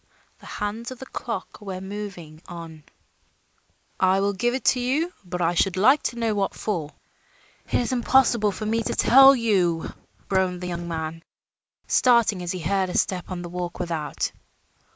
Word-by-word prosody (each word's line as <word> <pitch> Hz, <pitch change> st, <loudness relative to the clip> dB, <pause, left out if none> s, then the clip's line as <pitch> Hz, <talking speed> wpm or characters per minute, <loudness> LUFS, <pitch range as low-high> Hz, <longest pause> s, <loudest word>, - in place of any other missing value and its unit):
The -, -, -14 dB
hands 210 Hz, +3 st, -4 dB
of 255 Hz, -, -8 dB
the 265 Hz, -, -9 dB
clock 230 Hz, -7 st, -6 dB
were 190 Hz, -3 st, -5 dB
moving 190 Hz, -5 st, -7 dB
on. 165 Hz, -3 st, -9 dB, 1.1 s
"I 190 Hz, +1 st, +3 dB
will 200 Hz, +1 st, +1 dB
give 240 Hz, +6 st, 0 dB
it 265 Hz, -, -5 dB
to 255 Hz, -, -4 dB
you; 295 Hz, +8 st, 0 dB
but 180 Hz, -1 st, -3 dB
I 170 Hz, +1 st, +2 dB
should 185 Hz, +1 st, +1 dB
like 265 Hz, +10 st, +5 dB
to 240 Hz, -, -2 dB
know 230 Hz, -2 st, 0 dB
what 200 Hz, -1 st, -1 dB
for." 170 Hz, -8 st, -3 dB, 0.8 s
"It -, -, -2 dB
is 245 Hz, -, +1 dB
impossible 240 Hz, -4 st, +3 dB
for 215 Hz, -, -6 dB
me 225 Hz, +2 st, +1 dB
to -, -, -3 dB
tell 270 Hz, +2 st, +7 dB
you," 185 Hz, -9 st, +1 dB, 0.3 s
groaned 185 Hz, -2 st, 0 dB
the 180 Hz, -, -4 dB
young 170 Hz, 0 st, -4 dB
man, 165 Hz, 0 st, -4 dB, 0.6 s
starting 235 Hz, -6 st, +3 dB
as 175 Hz, -1 st, -3 dB
he 185 Hz, -, -4 dB
heard 190 Hz, +2 st, 0 dB
a -, -, -2 dB
step 180 Hz, -2 st, -1 dB
on 180 Hz, -1 st, -5 dB
the 175 Hz, -, -7 dB
walk 175 Hz, 0 st, -5 dB
without. 165 Hz, -5 st, -2 dB
195 Hz, 175 wpm, -24 LUFS, 175-230 Hz, 1.1 s, tell